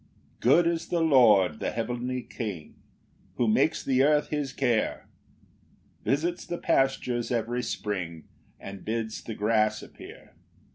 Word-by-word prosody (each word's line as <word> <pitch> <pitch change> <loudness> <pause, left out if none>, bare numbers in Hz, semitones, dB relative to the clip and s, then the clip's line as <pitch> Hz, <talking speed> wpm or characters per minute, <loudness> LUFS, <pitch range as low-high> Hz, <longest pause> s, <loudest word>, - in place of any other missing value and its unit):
1 - - -32 0.3
Good 150 +8 +4
is 170 -1 -1
the 175 - 0
Lord, 120 - +5
the - - -1
heavenly 125 +2 -3
King, 100 -10 -6 0.6
Who 120 - +1
makes 155 +9 +2
the 130 -1 +2
earth 150 +1 +3
his 145 -3 -2
care, 120 -5 -1 1.0
Visits 170 +6 0
the 175 - -5
pastures 130 -5 0
every 120 +1 -1
spring, 90 -8 -4 0.4
And 100 -1 -9
bids 110 0 -3
the 110 - -6
grass 110 0 +1
appear. - - -13
120 Hz, 135 wpm, -27 LUFS, 110-140 Hz, 1.0 s, Lord